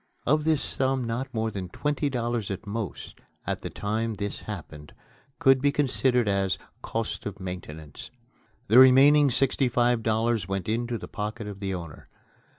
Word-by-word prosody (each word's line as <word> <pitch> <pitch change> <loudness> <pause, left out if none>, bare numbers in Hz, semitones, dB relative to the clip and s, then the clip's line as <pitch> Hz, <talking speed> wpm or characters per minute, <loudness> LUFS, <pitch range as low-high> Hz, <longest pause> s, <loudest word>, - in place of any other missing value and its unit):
Of 150 +3 +2
this 160 -2 +2
sum 130 -1 0
not 120 +3 -3
more 110 -1 -1
than 95 -3 -5
twenty 145 - -1
dollars 120 -4 -2
at 95 +2 -5
most, 105 -1 -6 0.2
at - - -3
the - - -5
time 110 +2 -2
this 100 0 -4
happened, 75 0 -9 0.4
could 135 -1 +4
be 145 0 +3
considered 130 -4 +1
as 100 -2 +1 0.2
"cost 115 -2 -3
of 100 0 -7
maintenance." 80 -5 -8 0.6
The 120 - +7
remaining 140 +3 +7
sixty 130 +1 +1
five 120 0 +2
dollars 110 -2 0
went 95 -2 -3
into 120 +2 -1
the - - -8
pocket 105 +2 -5
of 100 -1 -7
the 95 -2 -2
owner. 85 -4 -9
115 Hz, 160 wpm, -26 LUFS, 100-130 Hz, 0.6 s, The